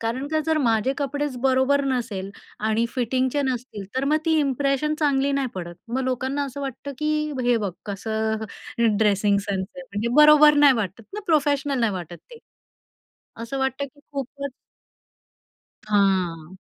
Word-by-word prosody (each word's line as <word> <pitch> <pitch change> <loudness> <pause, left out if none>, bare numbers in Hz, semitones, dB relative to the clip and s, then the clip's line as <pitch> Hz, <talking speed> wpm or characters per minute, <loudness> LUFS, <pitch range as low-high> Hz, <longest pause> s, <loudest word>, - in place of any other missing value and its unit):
कारण 240 +5 -2
का 315 0 +1
जर 320 -1 +2
माझे 225 +3 +2
कपडेच 285 -1 -2
बरोबर 270 +1 +3
नसेल 225 -8 -2 0.3
आणि 220 +2 +1
फिटिंगचे 260 +3 0
नसतील, 250 -6 -3
तर 265 - +1
मग 300 +2 +3
ती 320 -1 +3
इंप्रेशन 275 +2 0
चांगली 280 -2 +2
नाही 275 -1 0
पडत. 175 -2 -6
मग 250 +3 -1
लोकांना 260 +2 -1
असं 275 +1 -7
वाटतं, 275 +1 -5
की 305 0 0
हे 245 -1 +3
बघ 205 -5 -2
कसं 220 +2 -2 0.5
ड्रेसिंग 205 -1 +3
सेन्स 195 -2 -2
आहे. 270 - -7
म्हणजे 225 -2 -3
बरोबर 300 0 +8
नाही 290 -2 +7
वाटत 205 0 -3
ना, 420 - -4
प्रोफेशनल 285 -3 +1
नाही 225 -3 +2
वाटत 175 -2 -6
ते. 475 - -11 1.0
असं 270 +4 -4
वाटतं 265 +1 -1
की 285 +2 -21
खूपच 280 +1 -5 1.3
हां. 190 -5 +1
260 Hz, 150 wpm, -24 LUFS, 215-285 Hz, 1.3 s, बरोबर